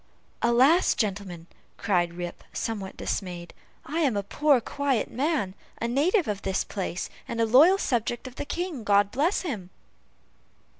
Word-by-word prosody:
"Alas! 260 +9 +4
gentlemen," 195 -5 -3 0.3
cried 175 -4 0
Rip, 175 0 -6
somewhat 200 -4 -4
dismayed, 175 -3 -4 0.3
"I 320 - -2
am 270 -10 +2
a 200 - -1
poor, 285 +6 +3
quiet 275 -1 -1
man, 270 - 0 0.3
a 230 - -1
native 315 - +2
of 205 -1 -2
the 190 - -2
place, 185 -3 -3 0.2
and 230 - -4
a 230 - +4
loyal 295 - +6
subject 240 - -1
of 255 - -7
the - - -5
King, 340 -6 -4
God 205 -1 +3
bless 315 - +1
him!" 215 - -5
230 Hz, 150 wpm, -26 LUFS, 195-285 Hz, 0.3 s, loyal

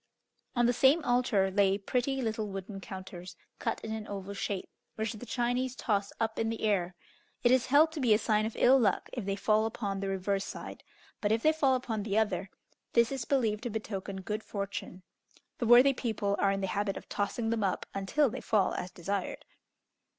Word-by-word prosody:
On 240 0 +3
the 245 - +3
same 275 +6 +4
altar 240 -6 +2
lay 195 0 +3
pretty 255 +5 -1
little 220 -1 -2
wooden 195 0 -6
counters 185 -2 -8 0.2
cut 230 - -1
in 220 - -6
an 220 -1 -5
oval 200 0 -5
shape, 200 -1 -3 0.3
which 220 +1 -2
the 225 +3 -9
Chinese 245 +2 -1
toss 200 -5 -1
up 225 -1 -1
in 225 - +1
the 225 0 -4
air; 185 -4 +1 0.5
it 240 - +5
is 255 0 +3
held 295 +4 +5
to 320 - -6
be 250 -5 +2
a 210 - +7
sign 215 -1 +1
of 225 - -7
ill 265 +2 +6
luck 205 -6 +1
if 240 -6 -4
they 195 0 -1
fall 215 +2 +2
upon 205 -3 -3
the 195 - -3
reverse 195 +1 -1
side, - - -8 0.4
but 205 - +1
if 225 +1 +1
they 310 - +5
fall 275 -4 +3
upon 230 -4 -2
the 205 0 -1
other, 200 -3 0 0.4
this 235 +1 +4
is 265 -4 -3
believed 225 -6 +1
to 240 - -3
betoken 200 -3 -5
good 210 +2 -3
fortune. 200 -2 -5 0.6
The 235 - 0
worthy 250 +4 +8
people 215 -5 -1
are 195 - +3
in 195 0 -1
the - - 0
habit 200 -1 -1
of - - -10
tossing 225 +3 -2
them 225 -2 0
up 190 - -1
until 195 +10 +2
they 260 +2 -5
fall 205 -4 +2
as 180 - -4
desired. 190 +2 -4
215 Hz, 205 wpm, -30 LUFS, 195-240 Hz, 0.6 s, worthy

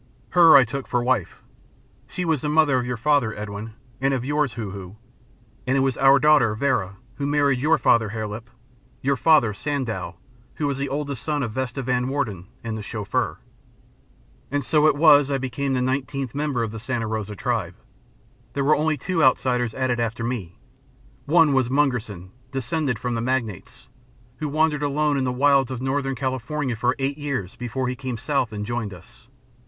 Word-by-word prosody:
Her 170 -2 +7
I 135 -2 +8
took 135 +3 -5
for 125 -1 0
wife. 125 -7 -1 0.6
She 180 - -4
was 160 -5 +1
the 150 - -2
mother 150 -4 +3
of 125 - -3
your 125 -1 -2
father, 135 -3 +1
Edwin, 105 +1 -6 0.3
and 135 0 +2
of 125 -1 -3
yours, 145 -3 0
Hoo 110 -4 -5
Hoo. 95 0 -9 0.7
And 130 +2 +2
it - - +3
was 135 -2 +1
our 135 0 +6
daughter, 145 -7 +4
Vera, 105 -7 0 0.2
who 140 - -2
married 145 -3 +2
your 155 +3 +3
father, 115 -2 +3
Hare 110 0 -4
Lip 110 +3 -7 0.5
your 140 +1 +2
father, 125 -4 +4
Sandow, 115 - -3 0.4
who 150 - -2
was 140 -1 -1
the 140 0 -2
oldest 140 -2 -3
son 150 -2 -1
of 115 - -3
Vesta 130 +2 -3
Van 125 0 0
Warden 115 -10 -3 0.2
and 115 -1 -4
the 110 - -5
Chauffeur. 105 -1 -2 1.1
"And 145 +1 -1
so 155 -1 +4
it 155 - +3
was 145 -2 +6
that 140 - 0
I - - +1
became 135 +1 -2
the 125 - 0
nineteenth 135 0 -2
member 140 -4 -1
of 110 - -3
the 110 - -7
Santa 120 0 -2
Rosa 110 -1 -4
Tribe. 100 -6 -2 0.8
There 140 - -1
were 150 +3 +4
only 155 0 0
two 175 -2 -1
outsiders 125 -3 +2
added 130 -2 0
after 115 0 -2
me. 115 -8 -4 0.7
One 160 -1 +5
was 130 -3 +2
Mungerson, 125 -10 -1 0.2
descended 135 0 -1
from 120 +3 -3
the 115 - -2
Magnates, 120 -5 -3 0.5
who 150 +2 -3
wandered 155 0 +1
alone 145 +1 +1
in 135 -1 0
the 125 - 0
wilds 135 0 +3
of 130 -2 -4
Northern 135 +1 -1
California 130 +1 -2
for 125 +3 0
eight 140 +2 -2
years 130 -11 -3
before 125 +2 -3
he 125 - -2
came 130 -3 -5
south 125 -1 -1
and 105 -1 -4
joined 115 -4 -3
us. 90 +6 -15
130 Hz, 190 wpm, -23 LUFS, 115-145 Hz, 1.1 s, I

